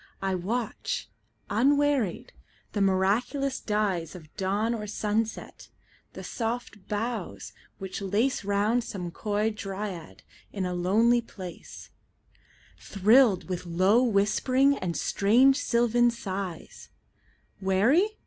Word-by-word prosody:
I 195 0 -1
watch, 215 +6 -3 0.4
unwearied, 275 -2 +1 0.4
the 205 - -2
miraculous 215 +9 +1
dyesOf 185 -6 -2
dawn 205 +4 0
or 210 -2 -4
sunset; 215 +2 -3 0.4
the - - -8
soft 225 -3 -4
boughs 215 -1 -4 0.2
which 190 -1 -6
laceRound 205 +1 +1
some 180 -6 -6
coy 210 +4 -1
dryad 195 -4 -6 0.3
in 195 -2 -3
a 180 - -2
lonely 220 +7 +3
place, 185 -6 -10 0.9
Thrilled 210 0 +3
with 180 -1 -4
low 185 +7 +3
whispering 255 +5 +2
and 175 -9 -3
strange 250 +7 +4
sylvan 240 -1 +3
sighs:Weary? 195 - -2
210 Hz, 95 wpm, -27 LUFS, 190-240 Hz, 0.9 s, strange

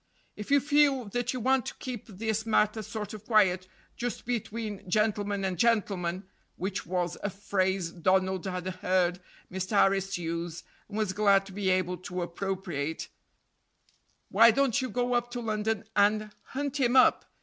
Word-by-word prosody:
If 210 - -8
you 285 0 +6
feel 285 -3 +3
that 245 +3 -1
you 255 - -3
want 260 +1 +2
to - - -5
keep 250 -4 -6
this 220 +1 -2
matter 220 -1 +2
sort 210 -1 -6
of 215 -1 -8
quiet, 190 -5 +3 0.3
just 245 0 -4
between 220 -4 -4
gentleman 205 -1 +1
and 185 -3 -2
gentleman 195 -6 +1 0.3
(which 190 0 -4
was 180 -1 -2
a 205 - -1
phrase 190 -2 -1
Donald 185 +1 +1
had 180 -1 -3
heard 185 -1 0 0.3
Mr. 190 +3 -2
Harris 195 -1 +3
use, 170 0 -4 0.3
and 210 - -6
was 210 -3 0
glad 200 -1 +4
to 195 - -11
be 195 0 -1
able 185 -1 +1
to 180 0 -4
appropriate), 175 -4 -4 1.2
why 230 +1 +7
don't 265 +1 +2
you 255 - -3
go 245 0 0
up 240 0 +1
to 245 0 -5
London 215 -2 -1
and 210 +1 +3
hunt 285 +1 -3
him 250 -1 +2
up? 260 - +5
205 Hz, 160 wpm, -29 LUFS, 185-230 Hz, 1.2 s, why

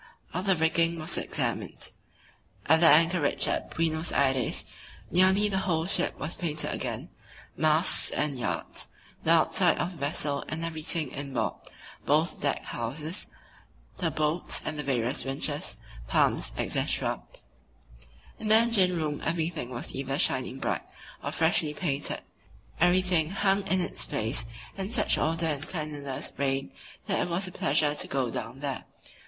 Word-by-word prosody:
All 180 - -1
the 190 -1 +2
rigging 165 +1 +2
was 160 +1 -2
examined. - - -2 0.7
At 160 +2 +5
the 170 - +7
anchorage 165 +4 +4
at - - -1
Buenos 160 0 0
Aires 130 -3 +1 0.5
nearly 190 +3 +4
the 195 -2 0
whole 165 -4 0
ship 190 - -1
was 155 +3 -3
painted 155 -3 -1
again, - - -4 0.5
masts 155 +2 +5
and 150 -2 0
yards, 125 - -3 0.4
the - - -1
outside - - +4
of 175 - -1
the 175 - -12
vessel 145 0 -1
and 160 +2 -3
everything 160 -2 +1
inboard, 140 -2 -2 0.5
both - - +1
deck - - 0
houses, 150 +9 -4 0.7
the - - +1
boats 155 +3 0
and 155 -1 -3
the - - +1
various 130 -1 0
winches, 135 +1 -2 0.3
pumps, - - +2
etc. - - 0 1.2
In 220 - -4
the 215 - +8
engine 220 -6 +4
room 150 -2 -2
everything 160 -5 -1
was 120 -2 -5
either 135 0 -2
shining 130 -2 +1
bright - - -1 0.4
or - - -2
freshly 150 -1 +1
painted, 145 -5 -1 0.6
everything 175 -2 +3
hung 195 +1 +1
in 190 - +3
its - - -2
place 115 +5 -1 0.3
and 195 +1 -4
such 230 -3 +3
order 165 +1 0
and 150 -2 -1
cleanliness 150 -5 -4
reigned 135 -6 -1 0.3
that - - 0
it - - -1
was 180 +3 0
a - - -7
pleasure 145 -1 +2
to - - -3
go 130 -3 -1
down 135 +4 -6
there. 140 -2 -3
155 Hz, 150 wpm, -28 LUFS, 140-175 Hz, 1.2 s, the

